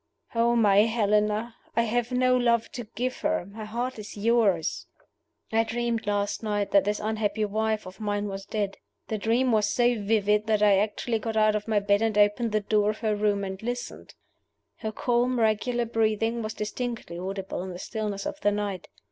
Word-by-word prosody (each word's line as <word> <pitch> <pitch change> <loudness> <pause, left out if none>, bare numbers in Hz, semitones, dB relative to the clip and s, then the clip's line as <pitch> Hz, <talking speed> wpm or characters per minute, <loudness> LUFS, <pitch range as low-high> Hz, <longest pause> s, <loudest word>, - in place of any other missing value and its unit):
"Oh, 235 0 +3
my 205 -4 +4
Helena! 215 0 +1 0.2
I 230 - +3
have 240 +2 -1
no 255 0 +3
love 235 -2 +2
to 240 -2 -6
give 255 +1 -2
her. - - 0
My 215 +3 -8
heart 240 +3 -3
is 210 0 -9
yours. 205 -6 +1 0.6
"I 225 0 +3
dreamed 230 -1 -2
last 205 0 0
night 205 -2 -1
that 200 -1 +5
this 210 0 0
unhappy 215 0 -1
wife 220 +1 -1
of 185 +3 -11
mine 205 -1 -1
was 195 -1 -6
dead. 205 -2 -2 0.3
The 220 - -2
dream 240 +4 +2
was 215 -2 +3
so 240 -1 +2
vivid 210 0 +2
that 215 -1 +2
I 200 -2 +5
actually 220 +2 -1
got 220 0 -3
out 215 0 +4
of 210 +1 -3
my 215 -2 +2
bed 200 +1 +2
and 225 -2 +1
opened 210 +3 +3
the 215 0 +1
door 210 0 +2
of 215 - -2
her 215 -2 +1
room 205 -1 +1
and 190 0 -5
listened. 245 +2 -5 0.6
"Her 220 -3 -4
calm, 245 +2 +1
regular 235 +2 +1
breathing 225 0 0
was 215 0 -4
distinctly 215 -5 -4
audible 195 0 -4
in 190 - -5
the 180 - -6
stillness 210 +1 -4
of 300 0 -5
the 205 - +3
night. 205 -3 -3
215 Hz, 190 wpm, -27 LUFS, 205-230 Hz, 0.6 s, that